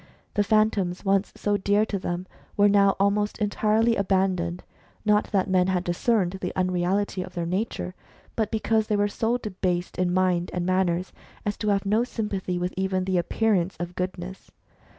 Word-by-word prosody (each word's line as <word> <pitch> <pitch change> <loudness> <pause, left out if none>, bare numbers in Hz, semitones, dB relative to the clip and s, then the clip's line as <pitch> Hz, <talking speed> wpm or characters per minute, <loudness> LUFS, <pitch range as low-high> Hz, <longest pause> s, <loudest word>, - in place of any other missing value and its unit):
The 205 - +2
Phantoms, 205 -4 +1
once 195 +1 +2
so 205 0 0
dear 205 +2 +2
to 200 -2 -3
them, 175 0 -3 0.3
were 205 0 +6
now 200 -1 +4
almost 205 +1 +1
entirely 215 +2 +2
aban 195 -2 +2
doned, 170 +1 -3 0.4
not 210 0 +3
that 195 0 0
men 185 -1 +3
had 185 -2 0
discerned 190 +1 0
the 180 - -2
unreality 185 +2 0
of 180 0 -8
their 170 -1 -2
nature, 185 +1 -2 0.4
but 220 -2 0
because 220 -1 +1
they 210 - +1
were 205 0 +2
so 225 +3 0
debased 185 -6 -3
in 180 -1 +2
mind 180 -1 +1
and 175 -1 -1
manners 185 -1 0 0.3
as 205 0 -1
to 210 - -3
have 200 -1 +1
no 215 +4 +2
sympathy 200 -6 -3
with 180 +1 -2
even 190 0 0
the 185 -2 +1
appearance 195 0 +1
of 175 0 -4
goodness. 180 +1 -5
190 Hz, 175 wpm, -25 LUFS, 180-210 Hz, 0.4 s, were